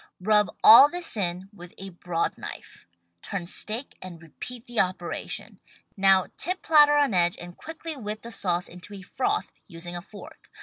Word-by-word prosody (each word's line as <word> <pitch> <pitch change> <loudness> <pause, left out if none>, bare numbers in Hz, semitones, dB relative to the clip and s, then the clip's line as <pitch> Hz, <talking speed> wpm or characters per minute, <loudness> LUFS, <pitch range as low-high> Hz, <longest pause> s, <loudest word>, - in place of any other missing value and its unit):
Rub 210 +2 +2
all 235 +6 +10
this 350 -3 -3
in 185 -2 -2
with 180 -3 -13
a 195 0 -8
broad 175 -1 -3
knife. - - -10 0.3
Turn 195 -4 -5
steak 220 +8 -4
and 180 -3 -9
repeat 225 +9 -9
the 240 -2 -3
operation. 180 -2 -3 0.4
Now 195 -1 +4
tip 365 +4 -3
platter 295 -2 +6
on 285 -6 +2
edge 175 -1 +2
and 175 0 -10
quickly 325 0 -8
whip 215 -4 -6
the 235 - -8
sauce 180 -5 -1
into 180 +4 -10
a 195 - -10
froth, 410 - -2 0.2
using 170 +1 -8
a 175 - -5
fork. 255 - -14
200 Hz, 170 wpm, -26 LUFS, 175-250 Hz, 0.4 s, all